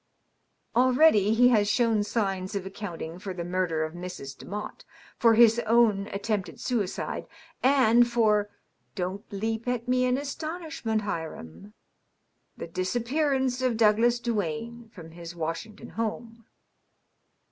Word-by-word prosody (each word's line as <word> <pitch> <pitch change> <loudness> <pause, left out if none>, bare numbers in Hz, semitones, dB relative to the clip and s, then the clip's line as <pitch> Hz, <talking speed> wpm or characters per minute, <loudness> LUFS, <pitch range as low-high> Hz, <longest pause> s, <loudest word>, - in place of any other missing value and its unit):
Already 250 -4 +5
he 245 +2 +6
has 210 -4 +3
shown 225 -2 +2
signs 195 -3 -2
of 195 -2 -3
accounting 175 -4 -6
for 190 -1 -6
the 175 - -4
murder 175 -3 0
of 155 0 -4
Mrs. 175 -6 -7
Demotte, 210 +7 -7 0.4
for 230 -2 +5
his 230 0 +6
own 220 -3 +3
attempted 200 -1 -3
suicide, 220 -7 -2 0.3
and 240 -3 +5
for 210 -3 +2 0.2
— - - -45
don't 190 +1 -4
leap 225 +3 -3
at 245 -1 -2
me 255 0 +2
in 250 0 +2
astonishment, 310 -6 -3
Hiram 105 - -6 0.4
— - - -33
^the 165 - -7
disappearance 255 +6 0
of 250 -3 +1
Douglas 230 +2 +4
Duane 230 +1 -3
from 165 -6 -12
his 170 +1 -9
Washington 165 +6 -5
home." 230 +1 -5
215 Hz, 130 wpm, -27 LUFS, 185-240 Hz, 0.4 s, he